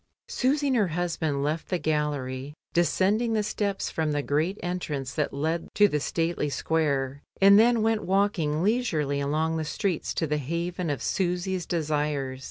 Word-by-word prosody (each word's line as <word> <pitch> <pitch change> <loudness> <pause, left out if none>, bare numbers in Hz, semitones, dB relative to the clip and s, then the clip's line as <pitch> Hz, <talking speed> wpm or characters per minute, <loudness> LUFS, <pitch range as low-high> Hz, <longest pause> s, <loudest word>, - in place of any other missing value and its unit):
Susy 280 +3 +1
and 260 - +2
her 210 -4 +3
husband 160 -4 -1
left 155 +3 -2
the 180 - +1
gallery, 145 -3 -2 0.2
descend 190 +5 +2
ing 235 -2 0
the 215 -1 +1
steps 200 -1 -2
from 160 -2 -1
the 145 -1 -1
great 155 +8 0
entrance 155 -7 -3
that 150 -2 -1
lead 160 +4 -2
to 205 0 +6
the 150 -6 -1
stately 165 0 -1
square, 140 -3 0 0.2
and 200 +1 +8
then 230 0 +4
went 225 -1 +1
walking 180 -6 +1
leisurely 165 - +1
along 155 +3 0
the 160 - -1
streets 175 +2 -2
to 165 - 0
the 150 0 -1
haven 170 +4 -3
of 145 - -2
Susy's 180 -1 -1
desires. 150 -5 -1
165 Hz, 170 wpm, -27 LUFS, 150-190 Hz, 0.2 s, and